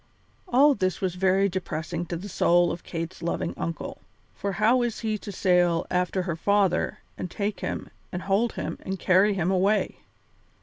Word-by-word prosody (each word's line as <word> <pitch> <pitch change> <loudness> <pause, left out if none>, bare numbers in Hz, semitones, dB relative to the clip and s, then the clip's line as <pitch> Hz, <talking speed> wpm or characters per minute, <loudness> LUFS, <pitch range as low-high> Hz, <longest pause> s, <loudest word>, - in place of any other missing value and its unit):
All 285 -1 +5
this 185 -7 -1
was 185 -2 -1
very 190 +2 +3
depressing 175 -2 -3
to 170 - -3
the 190 +5 -7
soul 175 -2 +3
of 170 - -5
Kate's 165 +1 -5
loving 170 0 -2
uncle, 165 0 -5 0.4
for 200 -1 -3
how 215 +6 +4
was 240 -2 -1
he 220 -2 0
to 205 - -7
sail 180 -3 +2
after 180 +1 0
her 170 -3 -2
father 195 +1 +1 0.2
and 180 - -3
take 205 +3 -3
him - - -4 0.2
and 180 0 -4
hold 205 +4 +1
him - - -4
and 190 0 -4
carry 190 +4 +4
him 180 0 +1
away? 195 +3 +2
185 Hz, 175 wpm, -26 LUFS, 175-200 Hz, 0.4 s, All